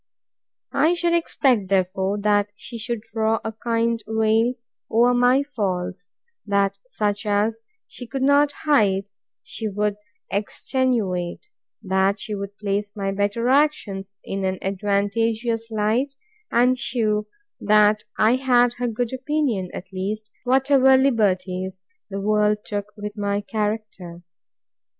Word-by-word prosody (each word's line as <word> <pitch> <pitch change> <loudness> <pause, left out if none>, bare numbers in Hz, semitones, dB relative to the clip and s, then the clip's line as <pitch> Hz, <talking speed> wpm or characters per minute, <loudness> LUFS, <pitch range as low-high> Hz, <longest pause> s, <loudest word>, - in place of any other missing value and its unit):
I 315 +5 +3
should 345 0 +1
expect, 265 - +2
therefore, 190 +1 +1
that 205 0 +2
she 230 +3 -8
should 225 0 -3
draw 225 0 0
a 220 - -2
kind 230 +1 -1
veil 220 +2 +2 0.3
over 240 +2 +4
my 245 +3 +4
faults; 185 -8 -3 0.3
that 200 -1 +1
such 205 -4 -1
as 210 +2 +1 0.2
she 245 - -10
could 265 +2 -3
not 285 +1 +4
hide, 205 -9 +2 0.3
she 220 - -5
would 210 0 -1 0.3
extenuate; 210 - -1 0.3
that 190 +1 +1
she 215 +1 -5
would 200 0 -6
place 205 0 -2
my 195 -2 -2
better 205 +4 0
actions 210 -9 +1
in 195 0 -4
an 190 0 0
advantageous 220 +4 0
light, 225 +6 0 0.3
and 250 +2 +3
shew 215 -5 0 0.3
that 210 0 +4
I 225 +4 +4
had 245 -2 +3
her 245 - 0
good 235 +1 -2
opinion, 260 -8 -1
at 185 +1 -9
least, 210 +3 -4
whatever 265 +1 +5
liberties 190 -7 0 0.3
the 195 0 -4
world 210 0 +1
took 205 -1 -3
with 210 0 -6
my 200 0 0
character. 210 -5 -4
215 Hz, 125 wpm, -23 LUFS, 200-245 Hz, 0.3 s, whatever